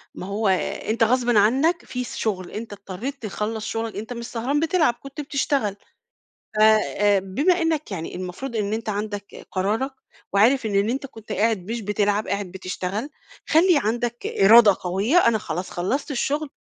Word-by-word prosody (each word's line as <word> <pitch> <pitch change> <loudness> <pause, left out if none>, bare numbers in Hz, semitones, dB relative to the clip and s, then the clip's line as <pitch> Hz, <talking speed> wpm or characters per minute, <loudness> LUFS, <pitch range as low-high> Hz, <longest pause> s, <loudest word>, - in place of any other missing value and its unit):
ما - - -6
هو، 205 +1 -1
آآ، 190 +2 -1
أنتَ 225 +1 +2
غصبًا 240 -1 +3
عنك، 275 - +2
في 250 0 -4
س - - -7
شغل، 185 -5 -2
أنتَ 220 -1 -6
اضطرِيت 205 +8 -6
تخلَّص 215 +1 -3
شغلَك، 225 -1 -3
أنتَ 220 +4 -5
مش 235 -1 -6
سهران 250 +6 -1
بتلعب، 320 -4 +2
كنت 275 +2 -7
بتشتغل. 275 -7 -1 0.8
ف 215 - -1
آآ 210 -2 +4
بمّا 285 - +1
إنَّك 320 -6 -1
يعني 165 -4 -5
المفروض 185 +8 -6
إن 210 -1 -1
أنتَ 220 0 -3
عندك 205 -1 -5
قرارك 210 +8 0 0.4
وعارف 230 +6 +4
إن 200 0 +1
أنتَ 270 +3 -2
كنت 225 -5 -11
قاعد 215 -1 0
مش 235 - -3
بتلعب، 210 0 0
قاعد 200 -1 -2
بتشتغَل، 190 +6 -4 0.4
خلِّي 335 +1 +5
عندَك 240 +2 -2
إرادة 210 0 +6
قويَّة 195 - +1
"أنا 230 -1 +3
خلاص 180 -1 -4
خلَّصت 255 - -2
الشغل، 290 +3 -1
220 Hz, 165 wpm, -23 LUFS, 200-265 Hz, 0.8 s, إرادة